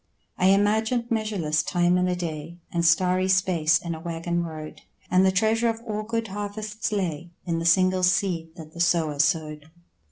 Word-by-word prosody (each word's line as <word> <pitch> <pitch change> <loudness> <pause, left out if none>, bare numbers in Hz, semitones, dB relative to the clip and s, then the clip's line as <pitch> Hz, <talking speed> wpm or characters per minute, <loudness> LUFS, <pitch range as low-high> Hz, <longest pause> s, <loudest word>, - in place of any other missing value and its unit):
I 185 - +4
imagined 220 +5 +2
measureless 200 -9 0
time 175 +1 +1
in 180 0 +2
a 180 - 0
day, 165 -1 -6
And 170 -1 -1
starry 180 +3 +3
space 185 -4 +3
in 170 -1 -5
a 160 - -7
waggon 170 +1 -3
road, 155 -2 -8 0.3
And 185 +1 +4
the 190 - +4
treasure 220 +4 +2
of 225 0 -3
all 215 -1 -3
good 225 0 -3
harvests 210 +2 -4
lay 175 -5 -3 0.2
In 170 -2 -1
the 165 - -4
single 185 +2 +3
seed 180 -3 0
that 160 -2 -11
the 170 - -11
sower 160 -4 +1
sowed. 150 +1 0
180 Hz, 180 wpm, -25 LUFS, 165-205 Hz, 0.3 s, I